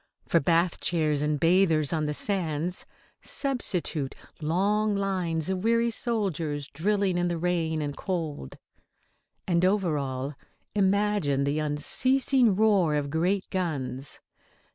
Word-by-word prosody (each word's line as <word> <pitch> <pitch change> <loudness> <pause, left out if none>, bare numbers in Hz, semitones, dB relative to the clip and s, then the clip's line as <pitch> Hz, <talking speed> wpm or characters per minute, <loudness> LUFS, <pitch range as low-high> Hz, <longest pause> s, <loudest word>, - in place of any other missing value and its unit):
For - - +4
bathchairs 165 -2 +1
and 150 0 0
bathers 165 -3 +3
on 155 -2 0
the 150 - -2
sands 175 -3 -1 0.3
substitute 180 - -2 0.3
long 205 +7 +1
lines 180 -5 -1
of 190 0 -2
weary 230 +1 +2
soldiers 170 - -2
drilling 195 +3 0
in 175 - +1
the 175 -1 -1
rain 165 -2 0
and 145 -1 -4
cold. 160 - -4 0.9
And 175 -1 +2
over 185 -5 +2
all 135 +1 -4 0.4
imagine 200 -8 +2
the 140 +2 0
unceasing 245 - +2
roar 195 -7 +3
of 145 -1 -2
great 180 +5 0
guns. 140 -7 -3
170 Hz, 120 wpm, -27 LUFS, 150-200 Hz, 0.9 s, For